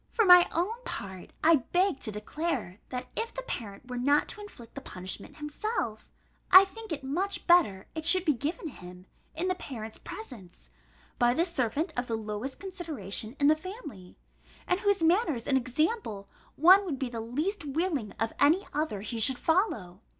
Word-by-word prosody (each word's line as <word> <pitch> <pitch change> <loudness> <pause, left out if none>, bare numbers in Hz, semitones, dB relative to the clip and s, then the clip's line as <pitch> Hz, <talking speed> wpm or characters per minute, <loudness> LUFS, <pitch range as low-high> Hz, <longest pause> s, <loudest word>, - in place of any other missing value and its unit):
For 450 - +2
my 360 -1 +8
own 420 +8 -1
part, 190 - -7
I 325 0 +6
beg 355 +4 0
to 215 - -4
declare, 220 - -4
that 250 0 -5
if 460 0 -3
the - - -4
parent 220 - -7
were 250 -1 -4
not 285 +4 +3
to 420 - -6
inflict 245 - -12
the 275 - -7
punishment 185 -6 -7
himself, 295 - -3 0.4
I 375 +1 +10
think 445 +1 -11
it 285 -3 -4
much 360 +9 -2
better 305 - +4
it 315 - -5
should 360 +3 +4
be 305 - +4
given 310 +6 -4
him, 180 -6 -12 0.3
in 340 +3 -1
the 370 - +2
parent's 225 -11 -8
presence, 190 - -10 0.5
by 240 0 +4
the 335 - +2
servant 310 - -1
of 245 0 -2
the 225 - -1
lowest 220 +4 -5
consideration 295 - -4
in 285 - +2
the 305 +2 +6
family, 310 - -10 0.5
and 360 - +1
whose 405 -4 +1
manners 325 - +2
and 275 - +2
example 255 - -1 0.3
one 370 +6 +7
would 305 -7 -3
be 260 -1 -3
the 230 -2 -5
least 310 - -2
willing 295 - -2
of 225 0 -1
any 320 +8 +4
other 295 -9 -2
he 225 +2 -4
should 255 +3 +6
follow. 245 - 0
290 Hz, 180 wpm, -29 LUFS, 225-360 Hz, 0.5 s, I